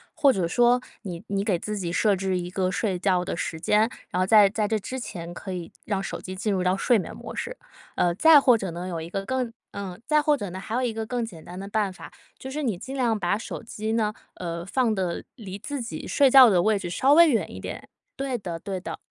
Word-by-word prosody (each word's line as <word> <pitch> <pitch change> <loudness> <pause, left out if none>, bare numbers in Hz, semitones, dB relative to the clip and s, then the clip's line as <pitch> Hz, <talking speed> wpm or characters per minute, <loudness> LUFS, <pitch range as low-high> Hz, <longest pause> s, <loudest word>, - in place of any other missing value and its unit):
或 285 -4 +5
者 185 -4 0
说 245 +6 +3 0.2
你 175 -4 -6
你 195 0 -1
给 195 -5 +1
自 210 +3 -4
己 175 -4 -3
设 205 +3 +3
置 190 0 -1
一 175 - -5
个 185 0 -1
睡 195 -2 -1
觉 180 -1 +1
的 180 - -3
时 160 - -3
间， 210 +6 +3 0.3
然 180 - -2
后 - - +3
在 205 0 +7
在 210 +1 -1
这 220 +1 0
之 260 +6 -5
前 175 -7 -6
可 190 +2 -7
以， 175 -2 -6
让 200 -3 -1
手 - - -5
机 185 - -7
进 210 +3 -1
入 185 -2 0
到 180 +1 +2
睡 235 +5 +3
眠 195 - -5
模 - - -8
式。 - - -4 0.4
呃， 175 - +2
再 315 - +7
或 250 -4 +5
者 195 -5 -4
呢， 175 +2 -5
有 170 -3 -3
一 160 +1 -7
个 195 - -2
更 255 -1 -2 0.2
呃， 195 -3 -6
再 305 -1 +4
或 300 -1 +3
者 205 -8 -5
呢， 185 +2 -6
还 195 +3 -7
有 250 - +1
一 245 -2 0
个 220 0 -3
更 245 +1 -2
简 175 -8 -9
单 180 +1 -8
的 195 - -6
办 205 -2 0
法， - - -11 0.3
就 265 - -7
是 295 +3 -3
你 225 -9 0
尽 265 +7 -7
量 240 -4 +1
把 185 +1 +1
手 220 - -6
机 220 -1 -4
呢， 215 -2 +1 0.2
呃， 170 -1 -5
放 230 +2 +1
得 185 -3 -2
离 200 -5 -8
自 285 +4 -4
己 230 - -6
睡 275 -3 +4
觉 260 -2 +10
的 180 -4 +3
位 215 0 +2
置， 175 - -5
稍 265 +10 +3
微 335 +1 +8
远 230 - 0
一 - - -7
点。 - - -7 0.3
对 270 -1 -2
的， 175 -4 -5
对 190 +2 -4
的。 180 - -6
205 Hz, 280 characters per minute, -25 LUFS, 185-240 Hz, 0.4 s, 觉